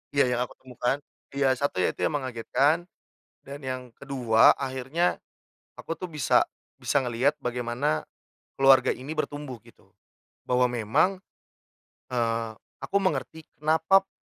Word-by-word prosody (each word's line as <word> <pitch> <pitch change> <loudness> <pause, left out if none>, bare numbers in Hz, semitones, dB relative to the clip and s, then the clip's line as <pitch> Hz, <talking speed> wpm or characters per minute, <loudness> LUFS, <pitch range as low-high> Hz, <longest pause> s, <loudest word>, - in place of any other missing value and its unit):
Iya 140 - +6
yang - - 0
aku - - -17
temukan, 125 +1 -1 0.4
iya 135 -1 +3
1 130 -8 0
ya - - +2
itu - - -25
yang 150 - -3
mengagetkan 140 +6 +1 0.6
dan 140 +1 -8
yang 130 -1 -3
kedua 125 -5 +4
akhirnya 135 +6 -1 0.5
aku 165 - -6
tuh 185 - -5
bisa, 155 -6 +2 0.3
bisa 140 - +1
ngelihat 125 +3 +1
bagaimana 120 - -1 0.5
keluarga 135 0 +6
ini 135 +5 -3
bertumbuh, 145 -6 -4
gitu. - - -22 0.5
Bahwa 125 0 +3
memang, 120 - +1 0.9
eee, 115 -2 -1 0.3
aku 200 - 0
mengerti 175 -4 -2
kenapa 160 +5 +4
p 195 - -35
135 Hz, 130 wpm, -27 LUFS, 125-150 Hz, 0.9 s, Iya